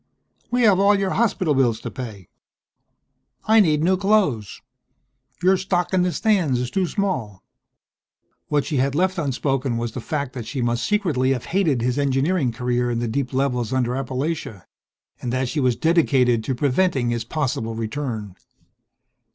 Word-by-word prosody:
"We 245 0 +1
have 200 -4 +5
all 200 +1 +4
your 195 -1 -1
hospital 190 -8 +1
bills 120 -5 +2
to - - -6
pay. 110 -8 -8 1.2
I 220 +1 +5
need 155 -6 +3
new 185 +2 +3
clothes. 185 - +1 0.8
Your 190 +1 +5
stock 180 -1 -1
in 185 - +3
the 180 0 +1
stands 175 - +1
is 125 0 -3
too 190 -2 0
small." 160 - -3 1.0
What 145 -1 +1
she 145 -5 0
left 175 +8 0
unspoken 135 -3 -1
was 115 0 -3
the 125 - -6
fact 140 0 -3
that 120 -4 -6
she 130 - -4
must 120 -1 0
secretly 155 -11 +1
have 125 - -5
hated 160 -10 +1
his 125 +3 0
engineering 140 +1 +1
career 125 +1 -1
in 120 - -1
the 120 0 -1
deep 125 +3 -2
levels 130 -3 -1
under 125 -2 +1
Appalachia, 135 - -3 0.6
and 120 - -3
that 130 +1 0
she 155 - -2
was 130 -3 +2
dedicated 130 -7 +2
to 130 - -1
preventing 135 -1 +1
his 120 -1 -2
possible 120 -4 -2
return.... 110 -4 -4
135 Hz, 160 wpm, -22 LUFS, 120-180 Hz, 1.2 s, have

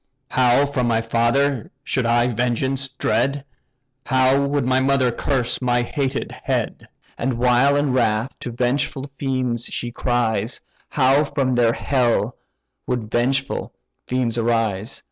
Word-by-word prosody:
How 125 +2 +4
from 130 -4 -1
my 115 -1 +2
father 120 +3 +1
should 125 -3 -1
I 120 +1 +3
vengeance 125 +3 0
dread! 135 +2 -1 0.6
How 130 +1 +3
would 140 -2 0
my 130 +1 +2
mother 130 -2 +2
curse 130 0 -1
my 120 -1 +1
hated 135 +1 -2
head! - - -3 0.3
And 130 +2 0
while 125 +3 +3
in 145 -2 +1
wrath 115 0 +1
to - - -5
vengeful 130 +3 -1
fiends 130 -4 -1
she 120 - -4
cries, 115 -2 -1 0.3
How 135 +1 +3
from 140 -3 -1
their 120 -1 +3
hell 125 -3 0 0.5
would 120 -4 -3
vengeful 135 +3 -1 0.3
fiends 125 -2 0
arise! 115 -2 0
125 Hz, 130 wpm, -21 LUFS, 120-135 Hz, 0.6 s, How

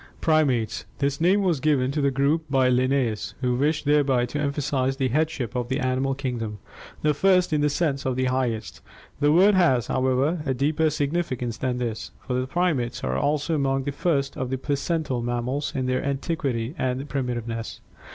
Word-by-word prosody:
PRIMATES 140 - +1
This 140 +1 -1
name 190 +4 +4
was 175 -6 +1
given 135 -2 +2
to 150 +1 -1
the 140 - +3
group 140 +4 +1
by 135 -2 +3
Linnaeus, 125 -3 0
who 125 -1 +1
wished 150 +5 0
thereby 140 -4 +3
to 145 +4 -4
emphasize 140 -2 -1
the 135 -2 0
headship 145 -4 -1
of 125 -1 -2
the 130 +2 0
animal 130 0 0
kingdom, 120 -6 -4 0.5
the 150 0 +3
first 180 +1 +3
in 150 - +2
the 150 - +3
sense 145 -2 -1
of 130 -1 -1
the 130 0 0
highest. 125 -3 -2 0.4
The 145 0 +3
word 190 +6 +6
has, 150 - +3
however, 130 +5 +1
a 135 -3 -1
deeper 155 +4 +1
significance 140 -6 -2
than 125 -1 -1
this, 115 -3 -3 0.2
for 125 - -3
the 130 +1 -1
primates 140 -8 -1
are - - -1
also 150 +3 0
among 135 -2 +1
the 145 - -2
first 140 -2 0
of 130 -1 -3
the 130 - -1
placental 145 -1 -1
mammals 120 +4 -2
in 130 - -1
their 130 0 0
antiquity 135 -4 -2
and 130 +2 -1
primitiveness. 120 -4 -3
135 Hz, 180 wpm, -25 LUFS, 125-150 Hz, 0.5 s, word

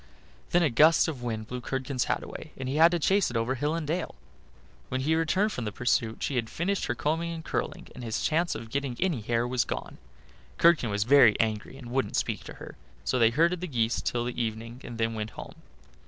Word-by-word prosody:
Then 175 0 +3
a 155 - +2
gust 155 +7 +5
of 145 -6 -4
wind 110 -3 -3
blew 125 +2 -6
Curdken's 130 0 -2
hat - - -1
away, - - -9
and 130 - -5
he 135 +3 -1
had 165 +2 +8
to 175 - 0
chase 190 +4 +2
it 120 - -2
over 115 +3 0
hill 145 +4 -1
and 165 -2 -3
dale. 165 - -2 0.7
When 130 0 -1
he 155 +4 +1
returned 185 +6 +2
from 125 - -4
the 105 - -2
pursuit 115 0 0
she 135 - -1
had 115 -2 -1
finished 195 +4 -1
her 120 - -1
combing 165 +5 -1
and 165 -1 -7
curling, - - -3
and 125 - -9
his 115 0 -2
chance 170 +3 +1
of 115 0 -8
getting 140 -3 -2
any 175 -11 0
hair 115 +2 0
was 125 -1 +1
gone. - - -6 0.6
Curdken 165 -8 +4
was 105 0 0
very 120 -3 +6
angry, 110 +3 -1
and 120 -3 -10
wouldn't 130 +1 -1
speak - - -1
to - - -8
her. - - -11 0.3
So 125 - 0
they 115 -1 +6
herded 165 +7 +2
the 180 - -3
geese 120 -5 0
till 120 0 -1
evening 115 0 -4
and 120 -1 -7
then 115 0 0
went 110 -1 -4
home. - - -8
130 Hz, 230 wpm, -28 LUFS, 115-160 Hz, 0.7 s, had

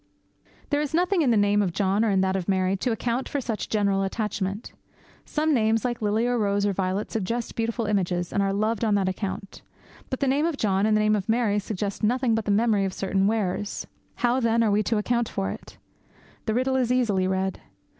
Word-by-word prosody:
There 290 0 +2
is 300 +1 -2
nothing 360 +1 +2
in 280 - +2
the 230 - +4
name 205 0 +3
of 185 -4 -1
John 200 +2 +1
or 225 - +2
in 195 -2 +2
that 190 0 +1
of 190 0 -3
Mary 190 0 +2
to 240 +6 -1
account 235 +3 -2
for 285 - -1
such 230 -5 -4
general 200 -2 +1
attachment. 200 +1 -3 0.5
Some 310 +1 0
names, 225 -2 +2
like 240 -2 -2
Lily, 215 +2 +1
or 245 -1 +1
Rose, 200 -1 +1
or 200 - +1
Violet, 190 +2 -2
suggest 230 +2 -2
beautiful 230 0 -1
images, 180 -4 -1
and 200 - +2
are 195 0 +1
loved 215 +3 0
on 215 -2 +2
that 195 -2 +1
account. 190 +1 -4 0.5
But 260 - -3
the 275 - +1
name 285 +5 +2
of 325 -4 -2
John 200 -2 +1
and 215 -1 +3
the - - +2
name 215 0 +3
of 205 0 -3
Mary 220 -3 +2
suggest 200 -1 -4
nothing 245 +2 +2
but 220 -1 0
the - - -3
memory 210 -1 +3
of 190 - -3
certain 195 0 0
wearers. 205 -2 -1 0.3
How, 245 +1 +1
then, 230 -1 +2
are 215 - +2
we 205 +1 +3
to 220 +1 0
account 235 +2 0
for 95 0 -2
it? - - -10 0.7
The 220 - +1
riddle 260 +2 +1
is 250 -2 +1
easily 210 -7 +2
read. 190 0 -1
215 Hz, 225 wpm, -25 LUFS, 195-235 Hz, 0.7 s, the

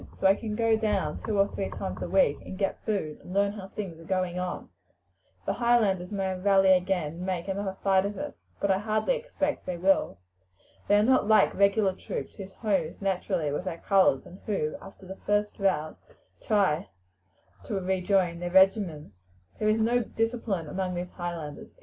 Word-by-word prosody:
So - - -2
I 190 - +8
can 210 +1 -4
go 225 0 +3
down 205 -8 -1
two 215 -2 -1
or 195 0 +4
three 195 - -4
times 195 - -5
a - - -3
week 185 -7 +3
and 185 - -8
get 195 -1 -2
food, 195 -9 -2
and 180 - -9
learn 200 0 +3
how 200 -2 -8
things 190 -5 -6
are - - -12
going 185 0 -1
on. 180 0 -4 0.8
The - - 0
Highlanders 215 -7 +2
may 195 -2 -1
rally 195 0 +5
again 180 -4 0
and 170 - -9
make 185 -1 -3
another 195 0 -3
fight 190 -1 +4
of 205 -1 -6
it; - - -5 0.2
but 200 - +1
I 190 - +2
hardly 215 - +1
expect 470 - -3
they 180 -1 -2
will. 190 - +2 0.7
They 205 - +5
are 210 - +4
not 260 -2 +3
like 215 -2 +5
regular 200 0 +3
troops, 140 - -6
whose 195 -1 -9
home 200 -7 +1
is 160 - -10
naturally 180 -6 -1
with 150 +6 -3
their 175 -3 -3
colours, 190 -9 +3
and 185 - -12
who, 155 -8 -1
after 195 0 -13
the 190 +1 -8
first 205 +1 +1
rout, 170 -6 0 0.5
try 195 -6 +2 0.8
to 210 - -3
rejoin 185 -2 +1
their 175 0 -3
regiments. 175 - +2 0.3
There 215 - +2
is 215 - +3
no 235 +2 +2
discipline 225 -7 -2
among 185 +3 -3
these 175 +1 -4
Highlanders. 170 -4 -6
195 Hz, 190 wpm, -28 LUFS, 180-205 Hz, 0.8 s, I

